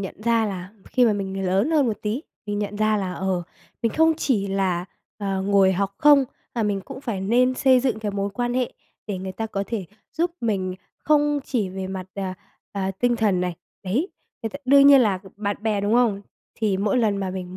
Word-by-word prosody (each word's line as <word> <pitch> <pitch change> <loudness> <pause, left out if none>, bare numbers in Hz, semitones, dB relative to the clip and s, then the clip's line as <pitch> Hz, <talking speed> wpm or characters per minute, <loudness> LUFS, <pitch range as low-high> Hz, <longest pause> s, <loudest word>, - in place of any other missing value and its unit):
nhận 200 +2 -7
ra 230 -1 +2
là 185 -2 -5 0.2
khi 250 -1 +2
mà 220 - +4
mình 195 -1 -3
lớn 195 - +2
hơn 295 -5 +3
một 220 - -1
tí, 220 +8 -2 0.2
mình 205 0 -2
nhận 205 0 -3
ra 215 0 +2
là, 190 -2 -2
ờ, 185 0 -1 0.4
mình 230 - +1
không 320 0 +4
chỉ 215 -11 0
là, 190 -3 0 0.3
ờ, 195 -2 -2
ngồi 195 -1 +4
học 195 +1 -1
không, 290 -2 +6 0.3
mà 230 - 0
mình 205 -2 0
cũng 260 +6 -9
phải 230 -8 -3
nên 250 +6 +3
xây 260 -2 +4
dựng 255 -4 0
cái 210 -2 -3
mối 200 0 -2
quan 240 +3 -2
hệ 255 -1 0 0.3
để 200 -3 -3
người 190 0 -5
ta 225 +3 -3
có 200 -2 -3
thể 215 -6 -3 0.3
giúp 340 +2 0
mình 190 -5 -1 0.2
không 295 -1 +2
chỉ 220 -8 -1
về 190 0 -5
mặt, 190 -1 -5
à, 190 -2 -3 0.4
à, 195 -1 -1
tinh 240 +5 0
thần 205 -5 +2
này. 180 -1 -1 0.3
Đấy, 240 - 0 0.3
người 225 - -2
ta 280 - -7
đương 275 +2 +7
nhiên 280 -1 +9
là 205 -6 +2 0.2
bạn 205 -1 -2
bè, 215 -2 +1
đúng 205 +3 +1
không? 220 -5 +2 0.3
Thì 210 -4 0
mỗi 205 +5 +1
lần 210 -4 +2
mà 190 -2 -2
mình 185 0 -6
205 Hz, 220 wpm, -23 LUFS, 190-245 Hz, 0.4 s, nhiên